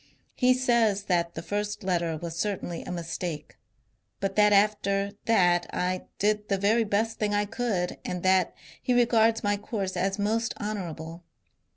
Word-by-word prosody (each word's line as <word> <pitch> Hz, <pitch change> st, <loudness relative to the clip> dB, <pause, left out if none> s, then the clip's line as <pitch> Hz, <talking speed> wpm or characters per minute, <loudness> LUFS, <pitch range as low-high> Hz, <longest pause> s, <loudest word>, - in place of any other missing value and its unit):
He 255 Hz, 0 st, +3 dB
says 235 Hz, -5 st, +2 dB
that 170 Hz, -3 st, 0 dB
the 160 Hz, -, -5 dB
first 205 Hz, +2 st, -3 dB
letter 170 Hz, -3 st, 0 dB
was 165 Hz, +1 st, -6 dB
certainly 175 Hz, -2 st, -3 dB
a -, -, -7 dB
mistake; 170 Hz, -2 st, -5 dB, 0.6 s
but 195 Hz, -1 st, -2 dB
that 210 Hz, 0 st, +5 dB
after 200 Hz, -1 st, +2 dB
that 175 Hz, -6 st, +3 dB
I 180 Hz, 0 st, -2 dB
did 210 Hz, 0 st, 0 dB
the 195 Hz, -, +2 dB
very 215 Hz, +4 st, +3 dB
best 220 Hz, +2 st, 0 dB
thing 210 Hz, -1 st, 0 dB
I 205 Hz, 0 st, +2 dB
could, 210 Hz, -5 st, -2 dB
and 180 Hz, -1 st, -4 dB
that 185 Hz, -1 st, +3 dB, 0.3 s
he 250 Hz, -, +1 dB
regards 230 Hz, -2 st, +3 dB
my 205 Hz, 0 st, +1 dB
course 200 Hz, -2 st, -4 dB
as 195 Hz, +2 st, 0 dB
most 220 Hz, +3 st, 0 dB
honourable. 175 Hz, -5 st, -5 dB
200 Hz, 160 wpm, -27 LUFS, 180-215 Hz, 0.6 s, that